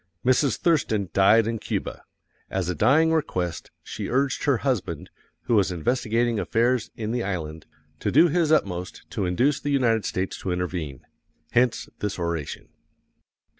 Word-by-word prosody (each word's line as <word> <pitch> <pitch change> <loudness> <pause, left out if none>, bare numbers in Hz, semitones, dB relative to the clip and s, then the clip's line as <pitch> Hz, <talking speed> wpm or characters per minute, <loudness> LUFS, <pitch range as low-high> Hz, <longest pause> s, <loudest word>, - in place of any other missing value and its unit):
Mrs. 130 -1 +3
Thurston 110 - +1
died 105 +3 +5
in 115 0 -2
Cuba. - - -4 0.5
As 95 -2 -2
a - - +1
dying 155 - +4
request 90 - -2
she - - -6
urged 135 +1 0
her 140 -4 +3
husband, 95 - -2 0.3
who 125 - -2
was 100 -4 +3
investigating 115 +5 0
affairs 120 +2 +1
in 110 -1 -4
the 120 0 -1
island, 80 -6 -4 0.3
to - - -1
do 160 +6 +6
his 165 -1 +1
utmost 90 - 0
to 95 - -1
induce 130 +11 +2
the 145 - -4
United 120 -6 +2
States 95 +1 -3
to 95 - -3
intervene 90 -6 -4 0.5
hence 120 -2 +2
this 105 -1 -3
oration. 85 -4 -4
110 Hz, 150 wpm, -25 LUFS, 90-130 Hz, 0.5 s, do